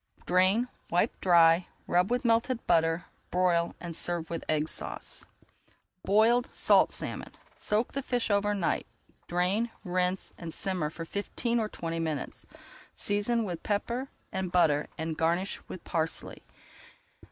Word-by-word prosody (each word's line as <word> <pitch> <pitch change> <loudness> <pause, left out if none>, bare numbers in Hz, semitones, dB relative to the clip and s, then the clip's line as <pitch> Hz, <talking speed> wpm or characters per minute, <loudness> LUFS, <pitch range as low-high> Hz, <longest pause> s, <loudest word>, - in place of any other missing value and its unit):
Drain, 190 +7 +3 0.2
wipe 180 +7 +1
dry, 170 -1 +5 0.2
rub 180 +2 +2
with 245 +1 0
melted 230 +1 +1
butter, 165 0 +2 0.2
broil, 175 -2 +1
and 170 -2 -5
serve 170 -1 +1
with 165 - -3
Egg 155 0 +1
Sauce. - - -4 0.8
BOILED 225 +5 +4
SALT - - +4
SALMON - - -3 0.2
Soak 215 +3 0
the 275 - -2
fish 245 -4 -1
over 205 0 +2
night, 190 -4 -1 0.4
drain, 185 +7 +1
rinse, 180 0 -1
and 170 -1 -6
simmer 180 -3 0
for 165 +2 -7
fifteen 235 +6 -2
or 215 -1 -1
twenty 165 -3 -4
minutes. 155 -4 -4 0.5
Season 210 +3 +1
with 175 -5 -4
pepper 235 +6 -2 0.2
and 185 -2 -3
butter 155 -5 +3
and 160 -1 -3
garnish 170 +4 0
with 180 - -8
parsley. 160 -1 -2
180 Hz, 135 wpm, -29 LUFS, 165-215 Hz, 0.8 s, dry